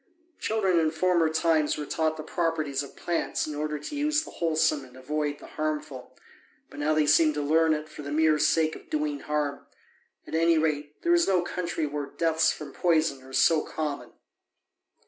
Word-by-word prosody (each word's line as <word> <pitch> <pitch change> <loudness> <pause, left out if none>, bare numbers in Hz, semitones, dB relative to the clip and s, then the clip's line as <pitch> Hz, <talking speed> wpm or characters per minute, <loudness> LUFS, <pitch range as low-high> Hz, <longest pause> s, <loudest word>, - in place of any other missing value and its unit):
Children 195 -5 +1
in 160 -1 +2
former 170 0 +2
times 160 -1 +1
were 150 - -4
taught 160 +1 -1
the 155 - -6
properties 155 -4 -1
of 140 - -9
plants 170 -1 -1
in 155 - -5
order 150 +1 -2
to 150 - -7
use 300 +1 +1
the - - -10
wholesome 160 -3 +1
and 130 0 -15
avoid 145 +2 -2
the - - -13
harmful; 150 -4 -5 0.5
but - - -10
now 155 +1 +1
they 155 -1 +3
seem 155 +1 +4
to 150 - -1
learn 160 +2 +3
it 155 0 -6
for 150 - -10
the 140 0 -6
mere 155 0 +3
sake 155 +1 +2
of - - -14
doing 150 -1 -1
harm: 150 -1 -3 0.6
at - - -11
any 165 0 +3
rate, 150 -2 -2
there 345 - +3
is 345 0 +4
no 185 -2 +2
country 175 -2 -3
where 145 -1 -4
deaths 160 +1 +1
from 150 - -8
poison 160 -5 +1
are 130 0 -14
so 155 +4 +4
common. 150 -2 -5
155 Hz, 190 wpm, -27 LUFS, 150-165 Hz, 0.6 s, seem